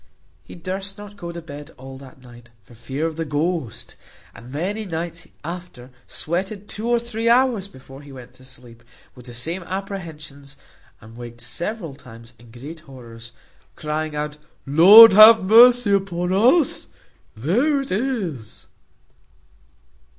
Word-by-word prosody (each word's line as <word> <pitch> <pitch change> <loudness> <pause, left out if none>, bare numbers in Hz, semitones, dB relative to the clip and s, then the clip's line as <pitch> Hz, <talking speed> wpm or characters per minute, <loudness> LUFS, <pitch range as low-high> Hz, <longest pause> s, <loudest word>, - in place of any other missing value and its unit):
He - - -13
durst 190 +3 -6
not 205 0 -12
go 170 -3 -8
to 170 -1 -9
bed 145 -1 -11
all 130 +1 -11
that 135 -1 -16
night, 120 -1 -16
for 95 - -19
fear 130 +7 -5
of 165 -1 -4
the 165 - -2
ghost; 155 - -4 0.4
and 115 - -14
for - - -12
many 200 +7 -3
nights 170 -2 -6 0.2
after 170 -7 -9 0.2
sweated 190 +5 -4
two 220 +2 -6
or 240 - +3
three 230 -1 -3
hours 240 -5 +2
before 135 -5 -15
he 145 -1 -14
went 130 -3 -13
to 130 - -20
sleep, 125 -3 -16 0.3
with 125 0 -16
the 120 - -11
same 165 +10 -4
apprehensions, 165 -7 -8 0.4
and 115 +1 -15
waked 120 -1 -10
several 170 - -6
times 115 -3 -15
in 120 -1 -18
great 140 +8 -11
horrors, 120 -6 -14 0.4
crying 155 0 -4
out, 150 0 -5 0.3
"Lord 195 +10 +9
have 215 +1 +8
mercy 235 +2 +6
upon 185 -2 -1
us! 255 - +2 0.5
there 245 - 0
it 275 - -9
is." 190 - -4
165 Hz, 150 wpm, -21 LUFS, 130-200 Hz, 0.5 s, Lord